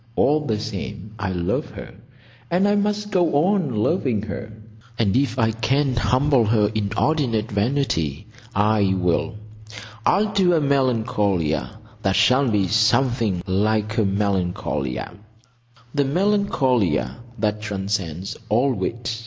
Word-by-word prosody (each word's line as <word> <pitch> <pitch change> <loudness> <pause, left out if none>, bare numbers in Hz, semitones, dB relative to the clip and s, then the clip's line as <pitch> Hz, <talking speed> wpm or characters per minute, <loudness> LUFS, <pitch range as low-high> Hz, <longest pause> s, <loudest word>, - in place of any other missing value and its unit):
All 145 +4 +3
the 110 -3 0
same 105 -1 -6
I 100 -1 -2
love 90 -1 -2
her; - - -9 0.6
and 185 +4 +2
I 205 - +3
must 205 0 -1
go 170 -5 +2
on 175 - 0
loving 110 - 0
her; 110 +1 -6 0.5
and 105 -4 +1
if 130 -2 +1
I 115 -2 +2
can 130 +4 0
humble 130 +1 +2
her 105 -1 +2
inordinate 110 +2 0
vanity 100 - -1 0.3
I 105 -1 +2
will. 90 +5 0 0.7
I'll 205 - +2
do 185 -3 +3
a 165 - +3
Melancolia 110 - 0 0.2
that 95 -2 +1
shall 130 +1 +4
be 100 -3 +1
something 110 -2 +2
like 105 +3 0
a - - +3
Melancolia—"the 105 - -3
Melancolia 135 - +1 0.2
that 105 0 -1
transcends 95 -4 -3
all 125 +5 +2
wit." 115 +2 -3
110 Hz, 120 wpm, -22 LUFS, 100-135 Hz, 0.7 s, shall